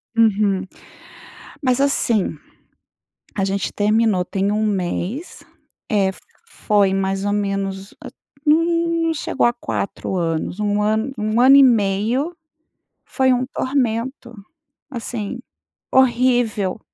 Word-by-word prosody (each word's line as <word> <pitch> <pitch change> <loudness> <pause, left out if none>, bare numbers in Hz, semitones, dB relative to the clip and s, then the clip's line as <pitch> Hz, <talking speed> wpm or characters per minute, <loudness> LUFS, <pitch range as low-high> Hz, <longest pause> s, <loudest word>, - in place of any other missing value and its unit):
Uhum. 205 -4 +2 1.0
Mas, 255 -1 +1
assim, 235 -7 +1 1.0
a 195 - 0
gente 195 0 -2
terminou, 210 -2 +2
tem 195 +2 -1
1 215 +1 0
mês, 200 - -3 0.5
é, 200 -3 +2
f 190 - -7 0.3
foi 205 - +1
mais 195 0 -1
ou 205 - 0
menos, 195 -1 -3 0.5
n 300 - +6
n 335 0 0
não 325 - +1
chegou 315 - -1
a 240 - +3
4 200 -5 -4
anos, 165 +2 -2
1 210 0 0
ano, 220 +5 0
1 215 +2 0
ano 265 +2 +7
e 280 - +8
meio. 235 - +1 0.7
Foi 260 -1 +1
um 250 +1 0
tormento, 255 -2 -2 0.6
assim, 235 -2 -5 0.5
horrível. 240 -6 +2
215 Hz, 115 wpm, -20 LUFS, 195-255 Hz, 1.0 s, e